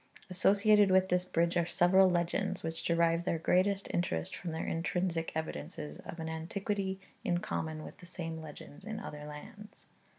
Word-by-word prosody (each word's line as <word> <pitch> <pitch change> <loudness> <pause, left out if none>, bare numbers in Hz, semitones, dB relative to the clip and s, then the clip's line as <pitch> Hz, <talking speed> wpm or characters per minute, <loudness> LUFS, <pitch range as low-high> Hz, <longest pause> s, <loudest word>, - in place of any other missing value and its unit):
Associated 200 +2 +5
with 190 0 +4
this 180 0 +2
bridge 170 -1 +1
are 170 -1 +2
several 190 +2 +5
legends, 180 +2 0
which 165 0 -3
derive 170 0 +2
their 170 - 0
greatest 190 +4 +2
interest 80 - -1
from 180 - -5
their 160 0 -3
intrinsic 165 0 -1
evidences 75 - -5
of 170 - -8
an 160 - -3
antiquity 190 +4 -2 0.2
in 175 - +1
common 160 -3 -3
with - - -10
the 180 - -12
same 165 -2 -5
legends 150 -1 -10
in 220 -1 -5
other 150 -7 -7
lands. 175 +8 -11
175 Hz, 165 wpm, -32 LUFS, 160-190 Hz, 0.2 s, Associated